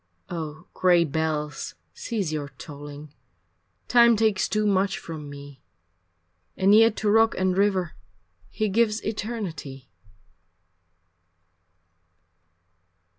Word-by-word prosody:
Oh, 160 Hz, -1 st, -6 dB
gray 175 Hz, -2 st, +4 dB
bells 150 Hz, -2 st, -3 dB, 0.2 s
cease 200 Hz, -, -3 dB
your 145 Hz, -2 st, -3 dB
tolling, 145 Hz, +1 st, -10 dB, 0.7 s
Time 235 Hz, -1 st, +6 dB
takes 215 Hz, -3 st, +1 dB
too 215 Hz, 0 st, 0 dB
much 195 Hz, -1 st, +1 dB
from 155 Hz, -3 st, -8 dB
me, 140 Hz, -1 st, -11 dB, 1.0 s
And 195 Hz, +2 st, +4 dB
yet 225 Hz, 0 st, +6 dB
to 215 Hz, -, -1 dB
rock 225 Hz, +1 st, +4 dB
and 185 Hz, -1 st, +1 dB
river 190 Hz, -4 st, +1 dB, 0.6 s
He 215 Hz, -, -1 dB
gives 215 Hz, +1 st, +1 dB
eternity. 190 Hz, -, -5 dB
185 Hz, 95 wpm, -25 LUFS, 150-215 Hz, 1.0 s, Time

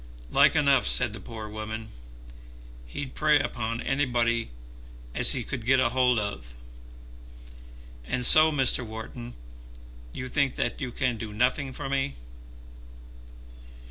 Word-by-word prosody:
"Like -, -, +5 dB
enough," 140 Hz, -3 st, +3 dB
said 120 Hz, -4 st, +1 dB
the 110 Hz, -, -7 dB
poor 110 Hz, -2 st, -8 dB
wife. 110 Hz, +1 st, -6 dB, 1.1 s
"He'd 130 Hz, -, -6 dB
prey 150 Hz, -1 st, +3 dB
upon 115 Hz, -4 st, -3 dB
anybody 120 Hz, -4 st, 0 dB, 0.6 s
as -, -, +4 dB
he 125 Hz, -, -2 dB
could 125 Hz, 0 st, -5 dB
get 130 Hz, +3 st, +3 dB
a 130 Hz, -2 st, +2 dB
hold 125 Hz, 0 st, +2 dB
of. 65 Hz, -, -4 dB, 1.5 s
And 125 Hz, -, 0 dB
so, 155 Hz, +4 st, +7 dB
Mr. 135 Hz, -3 st, +3 dB
Wharton, 110 Hz, -, -8 dB, 0.8 s
you 125 Hz, -, -6 dB
think 140 Hz, +1 st, 0 dB
that -, -, -2 dB
you 130 Hz, -2 st, -3 dB
can 125 Hz, -1 st, -1 dB
do 110 Hz, -1 st, -6 dB
nothing 125 Hz, +5 st, 0 dB
for 130 Hz, -, -6 dB
me." 135 Hz, -, -1 dB
125 Hz, 130 wpm, -27 LUFS, 110-135 Hz, 1.5 s, so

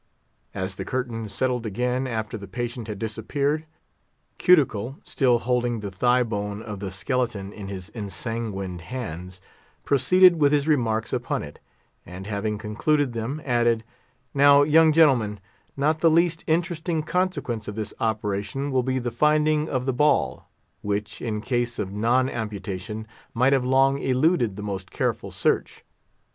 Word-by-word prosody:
As 95 Hz, -1 st, -3 dB
the -, -, -3 dB
curtain 120 Hz, -4 st, -3 dB
settled 125 Hz, +3 st, -1 dB
again 125 Hz, +4 st, -1 dB
after 110 Hz, -1 st, -3 dB
the 100 Hz, -2 st, -7 dB
patient 120 Hz, +2 st, -4 dB
had 105 Hz, -2 st, -5 dB
disappeared, 140 Hz, +8 st, -2 dB, 0.7 s
Cuticle, 135 Hz, -, +3 dB
still 125 Hz, -4 st, +2 dB
holding 120 Hz, -1 st, 0 dB
the 100 Hz, -1 st, -5 dB
thigh 125 Hz, +6 st, +3 dB
bone 105 Hz, -2 st, -4 dB
of 105 Hz, -3 st, -6 dB
the 100 Hz, -1 st, -4 dB
skeleton 100 Hz, 0 st, -2 dB
in 100 Hz, -2 st, -8 dB
his 95 Hz, 0 st, -7 dB
ensanguined 100 Hz, -3 st, -4 dB
hands, 90 Hz, -3 st, -7 dB, 0.4 s
proceeded 170 Hz, +5 st, +5 dB
with 145 Hz, 0 st, +5 dB
his 145 Hz, 0 st, +2 dB
remarks 115 Hz, -8 st, +1 dB
upon -, -, -1 dB
it; -, -, -10 dB, 0.4 s
and 90 Hz, +2 st, -9 dB
having 105 Hz, +1 st, -2 dB
concluded 125 Hz, +6 st, 0 dB
them, 120 Hz, +7 st, -4 dB
added, 120 Hz, -3 st, +2 dB, 0.5 s
"Now, 140 Hz, 0 st, +6 dB
young 160 Hz, +2 st, +5 dB
gentlemen, 130 Hz, -10 st, +3 dB, 0.4 s
not 155 Hz, +3 st, +1 dB
the 165 Hz, -, +5 dB
least 165 Hz, +1 st, +2 dB
interesting 165 Hz, 0 st, 0 dB
consequence 165 Hz, -, -1 dB
of 105 Hz, -, -5 dB
this 110 Hz, -2 st, -4 dB
operation 110 Hz, +5 st, -2 dB
will 130 Hz, -1 st, +2 dB
be 130 Hz, +1 st, -1 dB
the 120 Hz, -1 st, -2 dB
finding 150 Hz, +4 st, +2 dB
of 130 Hz, -2 st, -1 dB
the 130 Hz, -, 0 dB
ball, 125 Hz, -, +1 dB, 0.3 s
which, 105 Hz, +1 st, -3 dB
in 105 Hz, -3 st, -2 dB
case 120 Hz, 0 st, -1 dB
of 95 Hz, -2 st, -3 dB
non 120 Hz, +5 st, +2 dB
amputation, 105 Hz, -2 st, -5 dB, 0.3 s
might 130 Hz, +4 st, +4 dB
have 135 Hz, -2 st, +2 dB
long 135 Hz, +2 st, +3 dB
eluded 130 Hz, -, +2 dB
the 105 Hz, -, -7 dB
most 95 Hz, -3 st, -5 dB
careful -, -, -2 dB
search. -, -, -1 dB
120 Hz, 150 wpm, -25 LUFS, 105-140 Hz, 0.7 s, Now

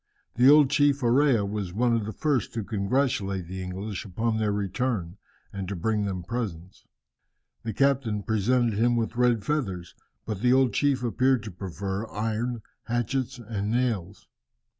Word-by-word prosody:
The 125 Hz, +3 st, +5 dB
old 145 Hz, -2 st, +7 dB
chief 145 Hz, -1 st, +3 dB
Orea 120 Hz, -2 st, +3 dB
was 100 Hz, -3 st, -4 dB
one 120 Hz, +1 st, +2 dB
of 110 Hz, -2 st, -1 dB
the -, -, -3 dB
first 140 Hz, -4 st, -1 dB
to 115 Hz, -, -2 dB
congratulate 100 Hz, -3 st, 0 dB
the 95 Hz, +2 st, -6 dB
English 95 Hz, +2 st, -5 dB
upon 110 Hz, +3 st, -1 dB
their 105 Hz, -1 st, +1 dB
return, 100 Hz, -2 st, -2 dB, 0.4 s
and 100 Hz, -2 st, -4 dB
to 100 Hz, -, -3 dB
bring 105 Hz, +4 st, 0 dB
them 95 Hz, -3 st, -3 dB
presents. 95 Hz, -5 st, -5 dB, 0.7 s
The 115 Hz, -, -4 dB
captain 130 Hz, -5 st, +1 dB
presented 110 Hz, +1 st, +1 dB
him 120 Hz, +1 st, +3 dB
with 115 Hz, 0 st, -1 dB
red 120 Hz, -3 st, +2 dB
feathers, 95 Hz, -, -2 dB, 0.3 s
but 105 Hz, -3 st, -4 dB
the 125 Hz, +1 st, +4 dB
old 130 Hz, -4 st, +3 dB
chief 140 Hz, -1 st, +1 dB
appeared 130 Hz, 0 st, +2 dB
to 110 Hz, -, -6 dB
prefer 95 Hz, +3 st, -5 dB
iron, 115 Hz, +2 st, -2 dB, 0.2 s
hatchets, 125 Hz, +2 st, -1 dB
and 105 Hz, -3 st, -4 dB
nails. 110 Hz, -6 st, -1 dB
110 Hz, 160 wpm, -26 LUFS, 100-125 Hz, 0.7 s, old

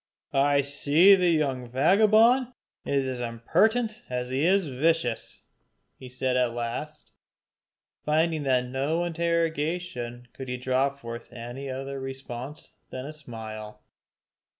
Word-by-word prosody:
"I 140 Hz, +1 st, +4 dB
see 145 Hz, +7 st, +5 dB
the 180 Hz, -2 st, +4 dB
young 135 Hz, -6 st, 0 dB
vagabond 220 Hz, -, +4 dB, 0.3 s
is 140 Hz, -1 st, 0 dB
as 130 Hz, -1 st, -3 dB
impertinent 220 Hz, -, +1 dB
as 125 Hz, 0 st, -3 dB
he 135 Hz, +3 st, 0 dB
is 190 Hz, +2 st, +3 dB
vicious," 140 Hz, -3 st, -1 dB, 0.6 s
he 130 Hz, -, -10 dB
said 125 Hz, 0 st, -1 dB
at 125 Hz, -2 st, +1 dB
last, 120 Hz, +6 st, -5 dB, 0.9 s
finding 160 Hz, +1 st, +1 dB
that 130 Hz, -3 st, +2 dB
to 125 Hz, -, -7 dB
no 140 Hz, +7 st, -1 dB
interrogation 165 Hz, -7 st, -2 dB
could 130 Hz, -2 st, -8 dB
he 125 Hz, -, -2 dB
draw 130 Hz, +2 st, +1 dB
forth 120 Hz, -4 st, -9 dB
any 120 Hz, +3 st, -7 dB
other 135 Hz, +1 st, -5 dB
response 135 Hz, +2 st, -7 dB, 0.2 s
than 130 Hz, 0 st, -6 dB
a 150 Hz, -, -6 dB
smile. 110 Hz, -6 st, -9 dB
135 Hz, 125 wpm, -27 LUFS, 125-165 Hz, 0.9 s, see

